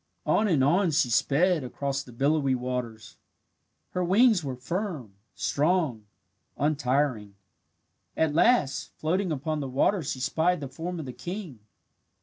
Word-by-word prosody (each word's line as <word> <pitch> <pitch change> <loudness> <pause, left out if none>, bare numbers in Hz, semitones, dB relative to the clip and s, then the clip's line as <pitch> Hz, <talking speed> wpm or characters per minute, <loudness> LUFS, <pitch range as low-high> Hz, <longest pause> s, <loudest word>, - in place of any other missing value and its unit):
On 215 - +2
and 155 -9 +3
on 175 +6 +3
she 145 -5 +1
sped 145 +7 +2
across 135 +2 -3
the 130 - -13
billowy 140 +2 +1
waters. 125 -3 -5 0.7
Her 180 - -1
wings 205 +1 +4
were 135 -3 -4
firm, 150 - -4 0.2
strong, 145 - 0 0.5
untiring. 135 -7 0 0.8
At 160 -2 +2
last, 170 - +2
floating 180 +3 0
upon 155 +1 -2
the 135 -2 -4
water 175 +9 +2
she 135 -3 -4
spied 165 +6 +1
the 140 - -5
form 165 +6 -5
of 155 - -5
the 125 - -7
king. 175 - -7
145 Hz, 135 wpm, -27 LUFS, 130-175 Hz, 0.8 s, wings